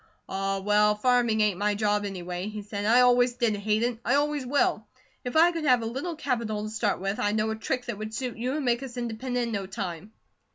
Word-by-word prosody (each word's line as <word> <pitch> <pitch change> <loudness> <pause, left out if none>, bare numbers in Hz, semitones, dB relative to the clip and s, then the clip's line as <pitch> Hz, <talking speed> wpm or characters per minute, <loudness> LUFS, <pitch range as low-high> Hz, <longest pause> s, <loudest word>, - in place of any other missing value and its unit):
"Ah, 195 0 -1
well, 210 +1 +3
farming 235 -1 +2
ain't 205 -3 +1
my 205 0 +1
job, 210 0 +1
anyway," 180 -1 -5
he 210 -1 -6
said. 205 0 -5
"I 235 +4 +5
always 245 0 +4
did 235 -3 +1
hate 210 +2 0
it. 240 -1 -1
I 250 - +2
always 290 -2 0
will. 245 -5 +1 0.4
If 250 - -5
I 335 +2 +6
could 330 -2 -4
have 250 -4 +4
a - - -3
little 270 +9 -4
capital 230 -8 -2
to 215 - -5
start 215 -2 0
with, 195 +2 -2
I 205 - +1
know 215 0 0
a - - -2
trick 250 +3 -3
that 225 -4 -5
would 215 0 -5
suit 250 -1 -3
you, 250 +4 -2
and 300 -3 -2
make 240 0 +1
us 260 -2 -8
independent 245 +1 -2
in - - -4
no 195 -2 -3
time." 190 -1 -6
220 Hz, 240 wpm, -27 LUFS, 210-250 Hz, 0.4 s, I